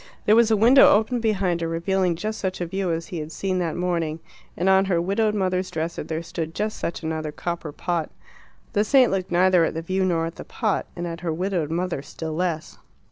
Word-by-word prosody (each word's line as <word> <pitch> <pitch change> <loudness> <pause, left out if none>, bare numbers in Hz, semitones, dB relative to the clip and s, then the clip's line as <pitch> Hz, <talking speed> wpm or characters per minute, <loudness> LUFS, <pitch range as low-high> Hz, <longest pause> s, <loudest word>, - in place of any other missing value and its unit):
There 210 - +5
was 230 -1 +5
a 220 - +3
window 245 +6 +7
open 220 +4 +3
behind 195 -6 0
her, 165 - -1
revealing 175 +2 0
just 215 +5 -4
such 185 -1 -3
a 175 - -1
view 190 +1 -2
as 165 0 -2
he 175 - -4
had 155 +1 -6
seen 185 +1 -2
that 170 -3 -1
morning, 170 -3 -1 0.4
and 180 - 0
on 190 0 +5
her 180 -3 +1
widowed 210 +4 +1
mother's 185 -2 0
dresser 165 0 -3
there 160 +1 -4
stood 160 -1 -5
just 215 +1 -2
such 170 - -4
another 160 -1 -3
copper 170 0 -4
pot. 170 +1 -2 0.6
The 205 -1 +3
saint 255 +2 +4
looked 190 -1 -1
neither 180 0 +4
at 165 - -1
the 165 - -3
view 190 +3 0
nor 170 -3 +1
at 165 - -6
the - - -7
pot, 215 -5 -1
and 175 - -4
at 165 -1 -5
her 175 -2 -2
widowed 175 -2 -1
mother 175 -2 -2
still 160 +2 -6
less. 165 -1 -3
180 Hz, 225 wpm, -24 LUFS, 165-195 Hz, 0.6 s, window